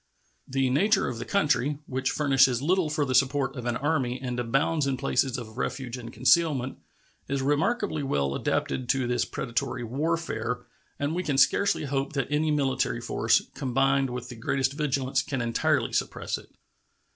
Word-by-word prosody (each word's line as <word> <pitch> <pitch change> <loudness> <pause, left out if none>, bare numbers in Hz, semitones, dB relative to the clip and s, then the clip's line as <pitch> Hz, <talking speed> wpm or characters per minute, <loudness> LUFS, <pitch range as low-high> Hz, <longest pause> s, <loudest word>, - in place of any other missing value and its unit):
The 135 -1 0
nature 200 +11 +3
of 120 -2 -4
the - - -5
country, 150 -7 +1
which 130 0 -1
furnishes 135 -4 +3
little 170 +3 +1
for 150 -1 0
the 130 - -2
support 135 +2 +2
of 125 -2 -5
an 120 -1 0
army 135 -3 0
and 125 -2 -3
abounds 140 +5 +1
in 135 -1 0
places 135 0 0
of 115 0 -8
refuge 125 -3 -3
and 120 -2 -8
concealment, 130 +1 +2 0.5
is 135 0 -1
remarkably 155 - +1
well 70 - 0
adapted 125 - -1
to 135 -2 +2
this 120 -1 0
predatory 120 +1 -3
warfare, 125 -3 -2 0.4
and 145 +2 -1
we 180 - -1
can 145 -6 -1
scarcely 195 +8 +3
hope 140 +1 -2
that 135 -1 -2
any 155 +1 +1
military 135 -5 0
force, 115 -1 +2
combined 135 0 +1
with 125 0 -6
the 125 - -8
greatest 130 +4 0
vigilance, 135 -2 0
can 135 -1 -3
entirely 115 -1 +1
suppress - - -2
it. - - -17
135 Hz, 170 wpm, -27 LUFS, 125-145 Hz, 0.5 s, nature